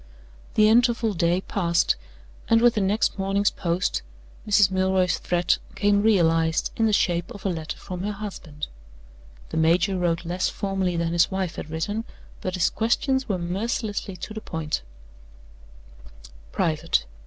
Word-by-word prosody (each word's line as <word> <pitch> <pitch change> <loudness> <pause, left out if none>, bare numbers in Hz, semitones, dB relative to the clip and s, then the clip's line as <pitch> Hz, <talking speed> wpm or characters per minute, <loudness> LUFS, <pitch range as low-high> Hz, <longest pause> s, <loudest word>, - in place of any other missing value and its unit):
The 215 0 +6
interval 235 -1 +3
day 170 +1 +1
passed, 170 -4 +1 0.5
and 225 - +6
with 240 0 +5
the 215 - 0
next 200 +1 +1
morning's 195 +1 +1
post 175 +1 -1 0.5
Mrs. 205 -2 +5
Milroy's 190 -1 +2
threat 175 0 +1 0.2
came 205 0 +3
realized 165 -6 +2
in 225 - +2
the - - +2
shape 175 -4 +1
of 205 - -10
a - - +2
letter 160 -3 -4
from 180 -1 -7
her 205 +2 -2
husband. 185 -8 -6 0.8
The - - -4
major 175 +4 +3
wrote 170 -1 0
less 180 +2 0
formally 190 -3 -1
than 170 0 0
his 170 0 +4
wife 190 -3 -2
had - - -6
written, 205 +8 -2 0.4
but 185 0 -3
his 180 - +2
questions 265 +3 0
were 195 - +1
mercilessly 200 +3 -3
to 215 - -7
the 220 - -6
point: 160 -5 -3 1.7
["Private." 155 - 0
190 Hz, 150 wpm, -25 LUFS, 170-210 Hz, 1.7 s, The